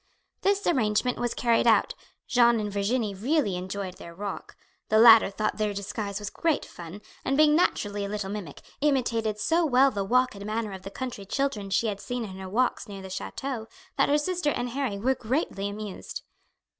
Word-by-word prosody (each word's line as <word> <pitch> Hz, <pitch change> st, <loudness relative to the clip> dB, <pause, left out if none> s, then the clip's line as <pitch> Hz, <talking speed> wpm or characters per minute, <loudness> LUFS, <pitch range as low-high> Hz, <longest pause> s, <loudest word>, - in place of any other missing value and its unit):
This 400 Hz, 0 st, +1 dB
arrangement 245 Hz, -5 st, +1 dB
was 240 Hz, -1 st, -1 dB
carried 235 Hz, -1 st, +2 dB
out; -, -, +4 dB, 0.3 s
Jeanne 235 Hz, -2 st, +4 dB
and 210 Hz, -1 st, -3 dB
Virginie 205 Hz, +2 st, 0 dB
really 230 Hz, -, 0 dB
enjoyed 185 Hz, +1 st, -5 dB
their 170 Hz, 0 st, -11 dB
walk; 200 Hz, +1 st, -6 dB, 0.3 s
the 215 Hz, -, +4 dB
latter 225 Hz, -2 st, +8 dB
thought 215 Hz, +2 st, -2 dB
their 210 Hz, -2 st, -1 dB
disguise 200 Hz, 0 st, -4 dB
was 205 Hz, -1 st, -5 dB
great 325 Hz, -3 st, 0 dB
fun, 175 Hz, +4 st, -10 dB, 0.2 s
and, 270 Hz, +1 st, 0 dB
being 300 Hz, 0 st, +6 dB
naturally 205 Hz, -, +1 dB
a 200 Hz, -, -3 dB
little 205 Hz, -2 st, -3 dB
mimic, 195 Hz, -9 st, -7 dB, 0.2 s
imitated 235 Hz, -7 st, +1 dB
so 330 Hz, +10 st, +2 dB
well 270 Hz, -2 st, +4 dB
the 200 Hz, -4 st, -2 dB
walk 250 Hz, +5 st, +2 dB
and 200 Hz, -1 st, -9 dB
manner 215 Hz, 0 st, -2 dB
of 190 Hz, -1 st, -7 dB
the 195 Hz, -, -7 dB
country 245 Hz, -2 st, -6 dB
children 215 Hz, -2 st, -2 dB
she 200 Hz, -, +1 dB
had 205 Hz, -2 st, -2 dB
seen 245 Hz, -1 st, -3 dB
in 190 Hz, -3 st, -7 dB
her 190 Hz, -1 st, -7 dB
walks 245 Hz, +5 st, 0 dB
near 195 Hz, -2 st, -8 dB
the 190 Hz, -, -8 dB
chateau 230 Hz, +4 st, -4 dB, 0.3 s
that -, -, +2 dB
her 290 Hz, -, +4 dB
sister 340 Hz, +1 st, 0 dB
and 245 Hz, -4 st, -2 dB
Harry 260 Hz, -6 st, -2 dB
were 250 Hz, +6 st, +2 dB
greatly 225 Hz, -5 st, -2 dB
amused. 205 Hz, -1 st, -7 dB
215 Hz, 195 wpm, -27 LUFS, 200-255 Hz, 0.3 s, latter